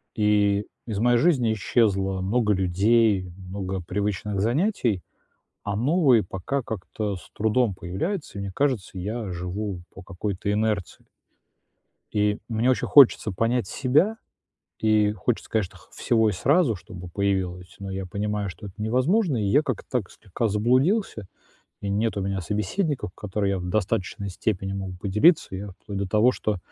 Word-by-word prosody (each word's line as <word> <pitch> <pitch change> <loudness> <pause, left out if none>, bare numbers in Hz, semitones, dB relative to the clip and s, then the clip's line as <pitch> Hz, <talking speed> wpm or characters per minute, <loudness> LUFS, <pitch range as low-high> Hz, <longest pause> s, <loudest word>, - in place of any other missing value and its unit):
и 105 -1 +2 0.2
из 105 -4 -3
моей 120 +1 +4
жизни 125 -8 +3
исчезло 95 -3 +1
много 105 +2 +2
людей, 95 +1 +2
много 95 0 -5
привычных 100 +2 -2
занятий, 120 - +1 0.6
а 100 -1 -2
новые, 130 - +4
пока, 95 +10 -3
как-то 105 -1 -4
с 85 - -14
трудом 110 -1 +1
появляются. 100 - -4
И - - -3
мне 100 - -5
кажется, 115 -6 -1
я 105 +3 -4
живу 90 +2 -4
по 95 - -10
какой-то 95 +1 -4
инерции. 105 -4 -1 1.1
И 105 0 +1
мне 115 +2 +2
очень 130 - 0
хочется 130 -6 +6
понять 115 +4 0
себя. 150 - +2 0.6
И 110 -1 +3
хочется, 105 +3 -2
конечно, 105 -5 -1
х - - -21
всего 110 -2 +2
и - - 0
сразу, 130 - +2
чтобы 90 -1 -10
появилось, 90 -1 -2
но 100 -1 -6
я 95 0 -4
понимаю, 105 +2 -2
что 100 +4 -10
это 95 - -12
невозможно. 140 - +2
И 110 -3 0
я, 110 +10 +4
как-то 130 -8 -4
так, 120 -8 -1
слегка 110 +3 -3
заблудился. 125 - +1 0.5
И 100 - -4
нет 105 +2 0
у 100 - -1
меня 95 0 -2
собеседников, 105 - -2
которые 100 -1 -2
я 95 - -1
б 90 - -5
в - - -4
достаточной 100 0 -1
степени 95 0 -2
мог 95 -1 -4
бы 90 - -9
поделиться. 105 - +3
И - - -4
я, 100 +1 -6
вплоть 100 +2 -8
до 100 -1 -2
того, 110 +5 +4
что 105 -3 -2
105 Hz, 160 wpm, -25 LUFS, 95-120 Hz, 1.1 s, хочется